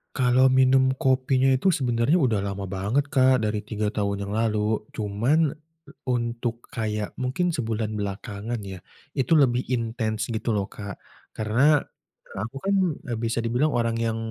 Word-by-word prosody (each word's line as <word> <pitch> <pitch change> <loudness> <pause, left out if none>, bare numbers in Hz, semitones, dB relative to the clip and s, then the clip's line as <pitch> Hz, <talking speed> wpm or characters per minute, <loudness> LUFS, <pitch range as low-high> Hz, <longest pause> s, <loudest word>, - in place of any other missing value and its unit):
Kalau 130 0 +4
minum 130 0 +4
kopinya 130 0 +2
itu 150 +7 +3
sebenernya 125 +3 +1
udah 125 - +2
lama 100 0 -4
banget, 125 +10 0
Kak, 130 -4 +4
dari 105 0 0
3 105 -1 -3
tahun 100 -2 -2
yang 100 - -5
lalu. 110 -1 0
Cuman 120 +10 +1 0.6
untuk 120 -1 -2
kayak 105 -2 -3
mungkin 130 +8 0
sebulan 110 -5 -2
belakangan 100 +3 -4
ya 95 -2 -7 0.3
itu 135 +3 +1
lebih 125 -4 +3
intens 115 -2 -2
gitu 110 0 -1
loh, 100 -1 -2
Kak. 100 -2 -7 0.4
Karena, 130 +7 +3 0.5
aku 110 +7 -5
kan 200 0 +1 0.4
e - - 0
bisa 115 0 -1
dibilang 125 +6 +1
orang 115 -1 +1
yang 115 -1 -1
115 Hz, 145 wpm, -25 LUFS, 105-130 Hz, 0.6 s, Kalau